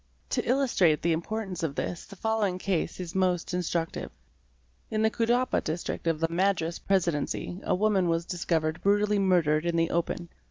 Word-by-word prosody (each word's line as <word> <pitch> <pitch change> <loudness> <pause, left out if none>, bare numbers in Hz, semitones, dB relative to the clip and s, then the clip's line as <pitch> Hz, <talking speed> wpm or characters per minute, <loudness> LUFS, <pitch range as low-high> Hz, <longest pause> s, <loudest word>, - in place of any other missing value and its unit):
To - - +1
illustrate 240 - +3
the 170 - +2
importance 185 +3 -3
of 155 -4 -2
this 175 - -4
the 200 - -11
following 215 -3 0
case 185 -3 -1
is 175 -2 -5
most 185 -2 0
instructive. 170 -2 -2 0.8
In 215 0 0
the 220 - +3
Cuddapah 240 +2 +1
District 165 +1 -3
of 165 -2 +1
the 165 - +2
Madras 170 -1 0
Presidency 175 -1 -1
a - - +1
woman 195 -2 +2
was 165 0 0
discovered 165 -3 -1
brutally 205 +1 +3
murdered 170 -5 +3
in 170 -1 0
the 165 0 +2
open. 170 0 -1
180 Hz, 165 wpm, -28 LUFS, 165-200 Hz, 0.8 s, illustrate